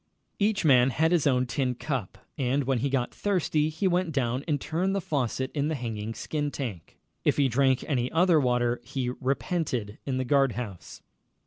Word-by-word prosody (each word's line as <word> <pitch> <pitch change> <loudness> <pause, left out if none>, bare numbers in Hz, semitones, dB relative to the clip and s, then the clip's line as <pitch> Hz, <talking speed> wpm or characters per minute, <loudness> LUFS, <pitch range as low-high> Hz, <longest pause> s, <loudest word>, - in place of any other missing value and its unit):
Each 205 -3 +1
man 130 -3 +6
had 160 +6 +1
his 170 -5 +3
own 130 -2 +3
tin 125 +1 -1
cup, 130 -7 -4 0.2
and 135 +1 0
when 130 -1 0
he 140 +4 0
got 130 -2 -1
thirsty 160 -6 +1
he 160 +5 -1
went 180 -1 +1
down 130 -2 -1
and 150 -3 +1
turned 185 +7 -1
the - - +1
faucet 130 -5 -2
in 145 -1 -1
the 160 - -1
hanging 115 -3 -4
skin 150 -2 -2
tank. 115 - -6 0.3
If - - +2
he 140 -2 +4
drank 130 +1 +2
any 125 -4 0
other 170 -1 +4
water 125 -2 +1
he 125 -2 -3
repented 125 - -2
in 130 -2 -1
the 130 - -1
guard 135 -1 +3
house. 105 -7 -7
135 Hz, 190 wpm, -27 LUFS, 125-155 Hz, 0.3 s, man